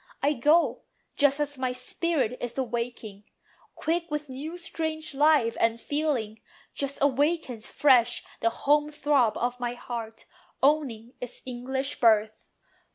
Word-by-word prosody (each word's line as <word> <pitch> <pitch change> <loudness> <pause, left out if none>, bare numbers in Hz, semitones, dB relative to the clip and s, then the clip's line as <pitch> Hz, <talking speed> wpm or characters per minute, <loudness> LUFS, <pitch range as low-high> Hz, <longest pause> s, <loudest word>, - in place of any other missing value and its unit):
I 290 +2 +3
go 300 +6 +3 0.3
Just 285 0 +3
as 290 -2 -2
my 255 -1 0
spirit 255 0 -1
is 245 +1 -5
awaking, 235 -5 -4 0.5
quick 335 +2 -1
With 300 -1 -3
new 295 +7 -6
strange 315 -3 -4
life 285 -5 +4
and 230 0 +2
feeling; 265 -7 -2 0.3
just 280 0 -3
As - - -2
awakens 285 -4 +1
fresh 245 -4 +3 0.2
the 230 - +2
home 295 +5 +2
throb 285 -6 +2
of 245 +1 -2
my 245 0 -2
heart, 230 -2 -7 0.4
Owning 265 -5 +1
its 250 -1 -8
English 265 +3 -3
birth. 220 -2 +3
265 Hz, 135 wpm, -27 LUFS, 235-295 Hz, 0.5 s, life